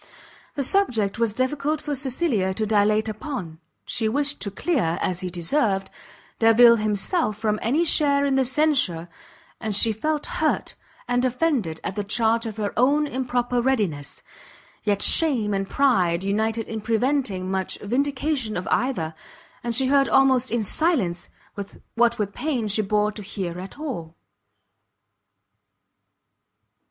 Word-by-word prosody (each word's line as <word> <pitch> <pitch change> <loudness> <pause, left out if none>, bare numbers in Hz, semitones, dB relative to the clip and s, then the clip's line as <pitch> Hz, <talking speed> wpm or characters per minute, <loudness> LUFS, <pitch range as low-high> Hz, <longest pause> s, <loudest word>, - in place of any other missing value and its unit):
The 280 - -1
subject 240 - +1
was 230 -2 +2
difficult 280 +6 -1
for 295 -1 -4
Cecilia 255 - -1
to 220 - -1
dilate 215 +1 +2
upon; 215 - -6 0.3
she 220 -2 -1
wished 285 +4 0
to 205 - -2
clear, 205 - -1
as 180 -1 -1
he 185 - -3
deserved, 195 - 0 0.5
Delvile 235 +1 +6
himself 215 - 0
from 215 -1 -1
any 280 +9 +1
share 285 -3 +3
in 275 - +1
the 265 0 +3
censure, 255 - +1 0.5
and 215 -3 -2
she 220 +2 +5
felt 300 +7 -2
hurt 315 -3 -1 0.3
and 245 0 +1
offended 250 - 0
at 190 - -4
the 205 - -2
charge 225 +2 +1
of 220 -1 -7
her 205 -2 -2
own 285 +5 +3
improper 245 -2 -1
readiness; 205 - -2 0.6
yet 205 -2 +1
shame 245 -11 +4
and 195 0 -2
pride 190 -11 +2
united 220 +3 -1
in 220 -1 -5
preventing 225 -5 -1
much 190 -1 -2
vindication 265 - -1
of 180 - -5
either, 185 -12 0 0.5
and 235 -1 -2
she 265 +2 +3
heard 275 +1 +3
almost 260 -2 +3
in 235 -1 0
silence 210 - 0 0.6
what 235 0 +2
with 200 -2 -3
pain 265 -8 -2
she 210 +1 +1
bore 210 +1 +1
to 210 - -9
hear 185 -4 -5
at 190 +7 -9
all. 195 - -6
230 Hz, 145 wpm, -23 LUFS, 200-275 Hz, 0.6 s, Delvile